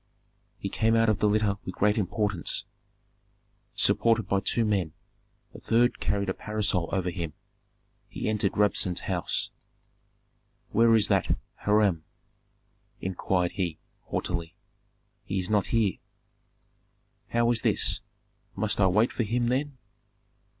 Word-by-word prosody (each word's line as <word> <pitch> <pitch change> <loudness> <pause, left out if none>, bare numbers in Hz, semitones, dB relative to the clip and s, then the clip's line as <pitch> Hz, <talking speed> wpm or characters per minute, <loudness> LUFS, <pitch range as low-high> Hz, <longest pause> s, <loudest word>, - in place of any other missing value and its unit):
He - - -4
came 110 +3 +1
out 115 0 +4
of 105 -2 +1
the 105 - +3
litter 105 -1 +1
with 90 - -6
great 105 +1 +2
importance, 105 -2 -1 1.1
supported 115 -1 +3
by 100 - +2
two 115 +3 +1
men; 95 -7 0 0.6
a - - -10
third 120 +2 +2
carried 100 -1 -1
a 95 - 0
parasol 105 -5 -1
over 90 -2 0
him. 85 -4 -4 0.8
He - - -4
entered 105 -2 0
Rabsun's 100 -3 +2
house. - - -1 1.2
"Where 115 +1 +5
is 110 - +4
that - - +2 0.3
Hiram?" 105 -6 +3 1.0
inquired 90 -1 -1
he, 85 -5 -2 0.3
haughtily. 85 -1 -3 0.7
"He 95 - -3
is 95 +1 -2
not 105 -3 +2
here." 110 -5 +1 1.3
"How 120 0 +2
is 115 - 0
this? - - +1 0.6
Must 100 0 0
I 95 - +6
wait 105 +6 +3
for - - -2
him, 120 +2 0
then?" 135 +2 -1
105 Hz, 130 wpm, -27 LUFS, 95-115 Hz, 1.3 s, I